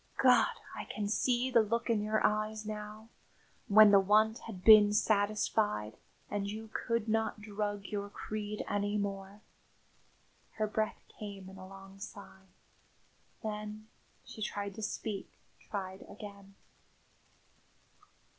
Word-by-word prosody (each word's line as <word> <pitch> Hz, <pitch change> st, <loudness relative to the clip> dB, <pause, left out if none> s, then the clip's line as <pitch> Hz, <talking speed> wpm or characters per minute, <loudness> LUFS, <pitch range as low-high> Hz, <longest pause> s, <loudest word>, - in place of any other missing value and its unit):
God! -, -, +6 dB, 0.3 s
I -, -, -5 dB
can 210 Hz, -1 st, -3 dB
see 245 Hz, +4 st, +1 dB
the 235 Hz, -2 st, +6 dB
look 230 Hz, +2 st, -1 dB
in 225 Hz, -3 st, +2 dB
your 215 Hz, +1 st, +1 dB
eyes 215 Hz, 0 st, 0 dB
now, 215 Hz, +1 st, -7 dB, 0.6 s
when 215 Hz, 0 st, +8 dB
the 200 Hz, -, +8 dB
want 215 Hz, +3 st, +3 dB
had 190 Hz, -5 st, -8 dB
been 210 Hz, -2 st, +9 dB
satisfied, 205 Hz, -, +1 dB, 0.3 s
and 200 Hz, -1 st, -2 dB
you 220 Hz, +1 st, -7 dB
could 230 Hz, -2 st, -1 dB
not 220 Hz, 0 st, 0 dB
drug 205 Hz, -1 st, -3 dB
your 205 Hz, 0 st, -4 dB
creed 210 Hz, 0 st, -5 dB
any 205 Hz, +1 st, 0 dB
more." 200 Hz, 0 st, -4 dB, 1.1 s
Her 215 Hz, -, 0 dB
breath 215 Hz, 0 st, -2 dB, 0.2 s
came 200 Hz, -3 st, -7 dB
in 190 Hz, -, -12 dB
a 185 Hz, -, -9 dB
long 195 Hz, 0 st, -13 dB
sigh. 190 Hz, -1 st, -10 dB, 1.0 s
Then 215 Hz, 0 st, -5 dB, 0.4 s
she 215 Hz, -, -10 dB
tried 200 Hz, -1 st, -3 dB
to 220 Hz, -, -8 dB
speak; 210 Hz, -1 st, -4 dB, 0.4 s
tried 190 Hz, -2 st, -4 dB
again. 200 Hz, -1 st, -11 dB
210 Hz, 125 wpm, -32 LUFS, 200-215 Hz, 1.1 s, been